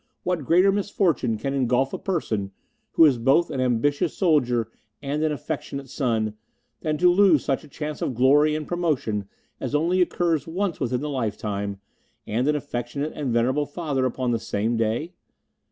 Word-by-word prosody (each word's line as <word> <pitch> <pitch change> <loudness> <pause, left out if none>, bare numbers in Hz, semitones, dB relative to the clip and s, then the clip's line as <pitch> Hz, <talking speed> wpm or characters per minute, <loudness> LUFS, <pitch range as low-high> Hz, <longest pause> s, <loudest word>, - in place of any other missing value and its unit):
What 175 -6 -1
greater 180 +7 +5
misfortune 185 - 0
can 135 +6 -3
engulf 130 0 +1
a - - -3
person 115 - -2 0.4
who 165 - +7
is 135 -6 +3
both 135 +8 +3
an 130 - -2
ambitious 140 +7 +1
soldier 125 - +2 0.3
and 145 +2 -3
an 155 - +1
affectionate 140 -1 -5
son, 110 -6 0 0.5
than 155 -1 -1
to 180 +3 +5
lose 180 -6 +4
such 135 +2 0
a - - -13
chance 150 +1 -6
of 130 - -2
glory 145 +5 +4
and 155 -1 -4
promotion 140 - -1 0.3
as - - -3
only 175 +5 +2
occurs 170 -4 +1
once 180 +2 -2
within 125 -1 -1
the 150 - -3
lifetime, 100 -5 -3 0.5
and 120 +6 -1
an 150 - +3
affectionate 140 +1 -4
and 140 -4 -3
venerable 130 +5 +1
father 145 -5 -1
upon 125 0 -2
the 115 - 0
same 115 +1 -1
day? 115 - -1
140 Hz, 170 wpm, -24 LUFS, 120-160 Hz, 0.5 s, who